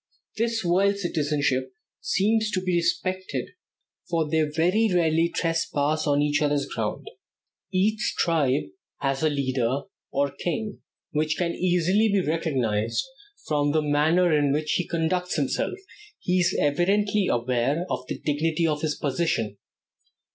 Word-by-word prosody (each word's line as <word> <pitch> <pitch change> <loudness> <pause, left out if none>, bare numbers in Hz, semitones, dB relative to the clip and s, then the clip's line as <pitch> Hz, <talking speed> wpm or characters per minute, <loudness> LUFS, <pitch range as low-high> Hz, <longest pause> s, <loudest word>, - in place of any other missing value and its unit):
This 230 0 0
wild 195 +3 +3
citizenship 145 -7 -1 0.2
seems 220 +2 +1
to 185 - +2
be 185 -1 0
respected, 185 +2 -1 0.6
for 165 -3 +1
they 160 +1 +2
very 175 +9 +2
rarely 165 -1 +2
trespass 155 -3 0
on 145 0 +3
each 150 0 +1
other's 145 -2 +1
ground. - - -4 0.6
Each 210 +3 +1
tribe 145 -5 +2 0.4
has 135 -1 0
a 155 - +3
leader, 130 -2 0 0.3
or 140 0 +1
king, 210 +7 -4 0.3
which 155 +1 0
can 175 -2 0
easily 185 +4 +2
be 200 - +3
recognized, 125 - 0
and 410 +11 -24
from 145 -1 +1
the 155 -1 +2
manner 155 +4 +3
in 145 -2 +2
which 150 +2 0
he 180 - 0
conducts 175 +2 -1
himself, 155 - -1 0.4
he 180 +1 0
is 175 - +2
evidently 200 +7 +2
aware 125 +7 0
of 125 -7 -4
the - - -4
dignity 155 +2 0
of 150 -2 0
his 155 -2 -1
position. 130 -8 -1
160 Hz, 140 wpm, -25 LUFS, 145-185 Hz, 0.6 s, wild